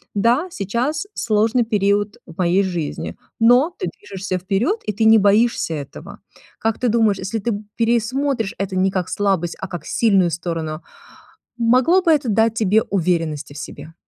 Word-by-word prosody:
Да, 240 Hz, -, +2 dB
сейчас 255 Hz, -, -2 dB
сложный 225 Hz, +2 st, +1 dB
период 205 Hz, -1 st, 0 dB
в 165 Hz, -, -14 dB
моей 185 Hz, +2 st, +2 dB
жизни, 175 Hz, -6 st, -4 dB, 0.2 s
но 245 Hz, +9 st, +4 dB
ты -, -, -3 dB
движешься 190 Hz, +2 st, -5 dB
вперед, 200 Hz, -, 0 dB
и -, -, -1 dB
ты 220 Hz, +2 st, 0 dB
не 220 Hz, 0 st, +7 dB
боишься 205 Hz, -2 st, +2 dB
этого. 140 Hz, -2 st, -9 dB, 0.4 s
Как 225 Hz, -1 st, -1 dB
ты 250 Hz, -, +1 dB
думаешь, 220 Hz, -3 st, +2 dB
если 205 Hz, +4 st, -3 dB
ты 235 Hz, +3 st, -2 dB
п 205 Hz, +1 st, -6 dB
пересмотришь 235 Hz, 0 st, 0 dB
это 195 Hz, -1 st, -3 dB
не 190 Hz, +1 st, +2 dB
как 185 Hz, -1 st, -2 dB
слабость, 190 Hz, -4 st, 0 dB
а 190 Hz, -, -5 dB
как 175 Hz, -4 st, -7 dB
сильную 195 Hz, -6 st, +2 dB
сторону, 165 Hz, -2 st, -4 dB, 0.8 s
могло 255 Hz, +10 st, +4 dB
бы 340 Hz, -3 st, +3 dB
это 295 Hz, -4 st, +2 dB
дать 225 Hz, +1 st, +2 dB
тебе 220 Hz, -1 st, +3 dB
уверенности 165 Hz, -6 st, -1 dB
в -, -, -11 dB
себе? 160 Hz, +2 st, -9 dB
205 Hz, 165 wpm, -20 LUFS, 185-235 Hz, 0.8 s, не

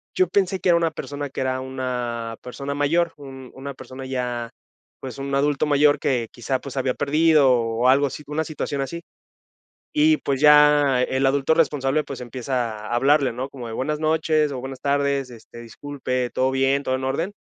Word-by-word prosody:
yo 185 Hz, -, +3 dB
pensé 190 Hz, +1 st, 0 dB
que 180 Hz, -, 0 dB
era 170 Hz, -, +5 dB
una 165 Hz, -1 st, +1 dB
persona 145 Hz, -1 st, -6 dB
que -, -, -4 dB
era 130 Hz, 0 st, -1 dB
una 125 Hz, -3 st, -4 dB
persona 140 Hz, +3 st, -5 dB
mayor, 165 Hz, +4 st, +1 dB
un 135 Hz, -3 st, -10 dB
una 140 Hz, +1 st, -7 dB
persona 130 Hz, 0 st, -10 dB
ya, 125 Hz, -3 st, -3 dB, 0.5 s
pues, 130 Hz, 0 st, -7 dB
un 140 Hz, 0 st, -5 dB
adulto 140 Hz, +1 st, +1 dB
mayor 145 Hz, 0 st, +4 dB
que 125 Hz, -5 st, 0 dB
quizá, 130 Hz, +2 st, -2 dB
pues, 140 Hz, -, -8 dB
se 135 Hz, -, -2 dB
había 130 Hz, -1 st, 0 dB
perdido, 150 Hz, -1 st, +3 dB
o 115 Hz, -2 st, +1 dB
o -, -, +6 dB
algo 140 Hz, +2 st, +4 dB
así, 145 Hz, +3 st, -8 dB
una 150 Hz, +2 st, -1 dB
situación 145 Hz, -2 st, -4 dB
así. 170 Hz, +5 st, -5 dB, 0.9 s
Y 310 Hz, +1 st, +4 dB
pues 135 Hz, -2 st, -2 dB
ya, 150 Hz, -3 st, +6 dB
el 130 Hz, +1 st, +1 dB
adulto 135 Hz, +2 st, +2 dB
responsable, 150 Hz, -2 st, +1 dB
pues, 135 Hz, -, -7 dB
empieza 120 Hz, -1 st, -3 dB
a 120 Hz, -, -3 dB
hablarle, 135 Hz, +2 st, +3 dB
¿no?, 130 Hz, +3 st, -5 dB
como 125 Hz, -4 st, -8 dB
de, 110 Hz, -, -6 dB
buenas 150 Hz, +5 st, -2 dB
noches 155 Hz, -1 st, +1 dB
o 130 Hz, -, -4 dB
buenas 135 Hz, 0 st, -7 dB
tardes, 140 Hz, -2 st, 0 dB
este, 115 Hz, 0 st, -13 dB
disculpe, 125 Hz, +1 st, -4 dB
¿todo 130 Hz, +1 st, +1 dB
bien, 135 Hz, +1 st, +2 dB
todo 130 Hz, -, 0 dB
en 130 Hz, -, -5 dB
orden?, 160 Hz, +9 st, -2 dB
135 Hz, 195 wpm, -23 LUFS, 130-150 Hz, 0.9 s, o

